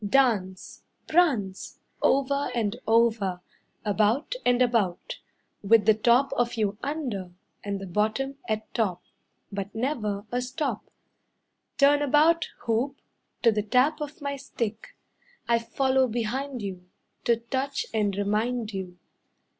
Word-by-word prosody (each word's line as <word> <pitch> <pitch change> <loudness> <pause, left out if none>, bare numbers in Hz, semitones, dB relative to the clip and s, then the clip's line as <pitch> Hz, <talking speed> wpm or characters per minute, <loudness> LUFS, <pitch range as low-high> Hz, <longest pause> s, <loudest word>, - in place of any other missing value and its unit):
Dance, 205 -5 +1 0.3
Prance, 255 - +1 0.2
Over 280 0 +2
and 220 -2 0
over, 220 -5 +2 0.4
About 215 - +1
and 245 0 +3
about, 230 -8 0 0.4
With 210 +1 +4
the 220 - +7
top 240 +5 +3
of 240 -2 0
you 210 -2 -1
under, 245 - -4 0.3
And 200 -1 -3
the 195 - -6
bottom 220 +9 -1
at 215 0 -3
top, 185 -7 -1 0.5
But 200 +1 -5
never 220 -5 -2
a 245 +1 0
stop. 260 +4 -3 0.9
Turn 290 +1 +5
about, 305 +4 +3
hoop, 250 +5 -1 0.4
to 230 - +6
the 210 -1 0
tap 255 +8 +2
of 295 +1 -6
my 280 0 -2
stick, 230 -5 -5 0.5
I 235 0 +3
follow 260 +2 +1
behind 245 +2 -3
you 180 -2 -7 0.4
To 235 - +4
touch 265 +4 -2
and 205 -3 +1
remind 215 +2 -1
you. 185 -2 -6
230 Hz, 125 wpm, -27 LUFS, 205-270 Hz, 0.9 s, the